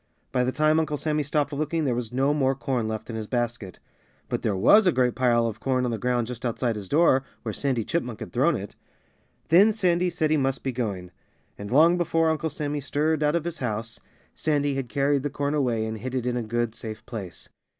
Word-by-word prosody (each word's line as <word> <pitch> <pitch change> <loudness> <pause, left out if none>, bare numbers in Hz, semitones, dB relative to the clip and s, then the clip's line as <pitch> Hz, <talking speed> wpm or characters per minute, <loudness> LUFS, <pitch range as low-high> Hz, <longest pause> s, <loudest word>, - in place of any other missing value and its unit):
By 125 -1 +1
the 125 - 0
time 155 +2 +3
Uncle 155 -2 -1
Sammy 150 0 0
stopped 145 0 -1
looking 155 +2 -1
there 130 - +1
was 120 -1 -3
no 135 +3 +2
more 135 -2 +1
corn 130 -4 -2
left 110 +2 -5
in - - -5
his 110 -1 -4
basket. 120 -5 -3 0.5
But - - -2
there 105 -3 0
was 190 - +5
a - - +6
great 125 -4 +2
pile 120 -2 +2
of 110 -2 -3
corn 130 +1 0
on 120 - -1
the 115 - -3
ground 125 -1 0
just 120 +1 -8
outside 120 -1 -1
his 100 -3 -7
door, 145 -4 +4 0.2
where 110 - -3
Sandy 130 -3 -1
Chipmunk 120 -5 -3
had - - -8
thrown 145 +7 +3
it. 100 +1 -6 0.8
Then 190 +7 +6
Sandy 180 -4 +1
said 160 -3 -1
he 155 - +4
must 135 -2 -1
be 135 - -1
going. 100 -8 -4 0.4
And 100 0 -8
long 165 +7 +5
before 165 -1 +2
Uncle 160 +1 -1
Sammy 150 0 -3
stirred 150 +2 0
out 150 +1 +2
of 170 - 0
his 170 -1 -4
house 115 -2 -4 0.3
Sandy 145 -2 0
had 135 -3 -3
carried 140 +1 +1
the 145 - -2
corn 145 +1 -2
away 120 -7 0
and 110 0 -4
hid 130 +3 -5
it 125 -2 -1
in 125 -1 0
a 125 - -1
good, 120 0 -2
safe 110 -1 -8
place. 110 -7 -8
130 Hz, 230 wpm, -25 LUFS, 115-150 Hz, 0.8 s, a